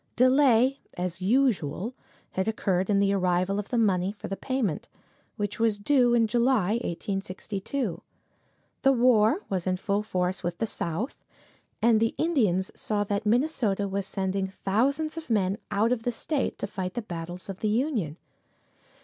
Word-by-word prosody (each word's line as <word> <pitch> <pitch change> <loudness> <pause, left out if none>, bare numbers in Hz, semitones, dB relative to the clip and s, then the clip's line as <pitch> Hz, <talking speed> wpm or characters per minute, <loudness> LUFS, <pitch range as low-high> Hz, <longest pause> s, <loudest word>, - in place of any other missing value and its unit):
Delay, 255 0 +4 0.2
as 180 0 -3
usual, 220 - +1 0.4
had 190 +2 -1
occurred 190 -4 0
in 205 - +3
the 200 0 +3
arrival 185 +1 +1
of 205 - -5
the 245 - 0
money 195 -4 +2
for 205 - -8
the 195 - -3
payment, 245 - -2 0.5
which 205 +1 -3
was 225 -2 +2
due 245 +2 +3
in 230 -1 +4
July, 235 -2 +2
1862. 195 +4 -3 0.8
The 270 - +5
war 245 - +4
was 190 -2 -2
in 185 0 +1
full 200 +2 0
force 185 -3 -1
with 175 -1 -3
the 225 - 0
South, 205 - -4 0.6
and 230 -1 +5
the 225 0 +1
Indians 215 - +1
saw 210 -1 -1
that 205 +1 -2
Minnesota 225 -5 +1
was 195 0 -3
sending 190 0 -1
thousands 270 - 0
of 320 -4 -7
men 200 -3 +1
out 220 +4 +2
of 250 -2 +1
the 245 - -1
state 280 +4 -2
to - - -3
fight 185 -3 -5
the 240 - -2
battles 175 -1 -6
of 195 -2 -6
the 215 - 0
Union. 220 - 0
205 Hz, 160 wpm, -27 LUFS, 190-240 Hz, 0.8 s, The